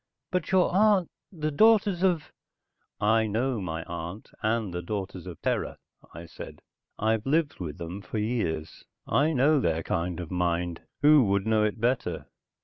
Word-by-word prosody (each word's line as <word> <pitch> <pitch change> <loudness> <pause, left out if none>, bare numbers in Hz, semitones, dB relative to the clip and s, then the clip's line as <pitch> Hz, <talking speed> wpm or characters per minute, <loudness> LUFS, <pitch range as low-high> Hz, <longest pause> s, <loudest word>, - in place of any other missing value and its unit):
"But 180 -2 -1
your 185 -2 +3
aun... 200 -1 +4 0.3
the 155 -4 -3
Daughters 205 +1 +4
of...." 180 -5 +1 0.7
"I 110 +1 +3
know 115 +2 -1
my 80 -3 -4
aunt 85 +5 -7
and 110 -3 0
the 90 - -3
Daughters 95 -1 -5
of 85 -3 -8
Terra," - - -1 0.3
I 85 +2 -9
said. - - -10 0.3
"I've 110 +2 0
lived 155 +1 +1
with 80 -5 -5
them 85 +4 -6
for 110 - -6
years. 105 -9 -2 0.2
I 150 +3 +3
know 145 +1 +4
their 80 -7 0
kind 85 +2 -2
of 85 -3 -6
mind. 85 -1 -1 0.2
Who 150 -3 +7
would 100 0 +1
know 110 -1 +3
it 105 +2 -1
better?" 120 +3 -1
110 Hz, 160 wpm, -27 LUFS, 90-145 Hz, 0.7 s, Who